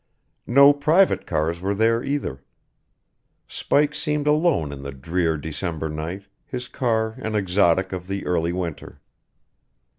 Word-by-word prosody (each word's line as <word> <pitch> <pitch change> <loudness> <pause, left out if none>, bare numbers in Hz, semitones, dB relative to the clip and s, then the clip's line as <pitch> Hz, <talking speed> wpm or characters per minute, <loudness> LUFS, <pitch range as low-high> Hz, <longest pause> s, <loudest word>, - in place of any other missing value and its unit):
No 140 +3 +7
private 155 +7 +2
cars 85 +3 -1
were 100 +2 -1
there, 115 +2 +2
either. 135 - -3 1.0
Spike 145 0 +1
seemed 150 -1 -1
alone 150 - +2
in 70 -1 -8
the 70 - -6
drear 80 +4 -1
December 80 +1 -4
night, 80 +6 -5 0.2
his 125 -1 -6
car 110 -3 0
an 110 0 -3
exotic 95 -2 +2
of 90 -1 -6
the 100 0 -4
early 85 -1 0
winter. 85 -3 -5
95 Hz, 130 wpm, -23 LUFS, 80-130 Hz, 1.0 s, No